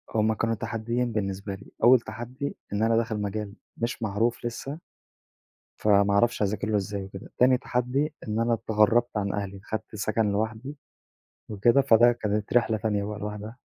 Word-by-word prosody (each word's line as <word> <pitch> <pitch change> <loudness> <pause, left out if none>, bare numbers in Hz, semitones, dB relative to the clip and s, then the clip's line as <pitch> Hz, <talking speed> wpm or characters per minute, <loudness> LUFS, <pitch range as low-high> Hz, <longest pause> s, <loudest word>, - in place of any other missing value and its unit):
هُم 110 0 +3
كانوا 115 +1 0
تحديين 115 +2 -2
بالنسبة 100 -2 -3
لي، 95 - -15
أول 125 +1 +8
تحدي 120 +5 -6 0.2
إن 105 +2 +1
أنا 115 0 +3
داخل 110 -2 -1
مجال 100 0 -3 0.2
مش 115 0 -3
معروف 110 +4 0
لسه، 135 +6 -5 1.0
فما 100 -1 +4
أعرفش 120 +3 +2
أذاكر 105 0 0
له 105 - +2
إزاي 100 0 -3
وكده، 95 0 -10
تاني 125 +1 +5
تحدي 130 +5 -1
إن 105 +1 -1
أنا 115 +1 +2
اتغرّبت 115 +1 +2
عن 100 -1 -1
أهلي، 100 -1 -4
خدت 110 0 -5
سكن 105 0 0
لوحدي 110 +7 -3 0.7
وكده، 115 +6 +4
فده 120 -1 +6
كانت 105 -3 -2
رحلة 115 -2 +3
تانية 105 -1 -1
بقى 105 0 -5
لوحدها. 105 +3 -6
110 Hz, 160 wpm, -26 LUFS, 105-120 Hz, 1.0 s, أول